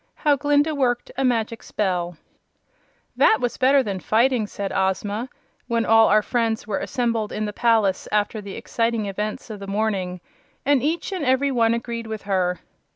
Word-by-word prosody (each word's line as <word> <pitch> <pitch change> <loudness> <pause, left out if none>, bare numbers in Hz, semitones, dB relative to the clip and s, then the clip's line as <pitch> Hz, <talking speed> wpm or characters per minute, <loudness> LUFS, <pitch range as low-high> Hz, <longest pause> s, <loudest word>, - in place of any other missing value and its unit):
How 295 -2 +2
Glinda 290 +2 +2
Worked 245 -4 0
a 270 - -1
Magic 230 -3 0
Spell 180 -4 -2 1.0
"That 440 - +5
was 245 - -2
better 270 +1 +4
than 200 -4 -3
fighting," 230 +2 +2
said 200 -1 -5
Ozma, 200 +5 -1 0.4
when 235 -1 0
all 225 0 +6
our 215 0 +4
friends 230 -2 -1
were 210 -2 -2
assembled 230 -4 -1
in 215 - -2
the 210 - -4
palace 220 -5 +2
after 210 +1 0
the 200 -1 -8
exciting 230 -2 -1
events 210 +3 -4
of 210 - -7
the 200 - -8
morning; 195 -3 -1 0.5
and 280 -2 +3
each 315 +7 -1
and 370 -5 -3
every 265 +1 +2
one 230 -2 +3
agreed 235 -1 -5
with 220 -2 -6
her. 185 -3 0
225 Hz, 170 wpm, -23 LUFS, 205-250 Hz, 1.0 s, all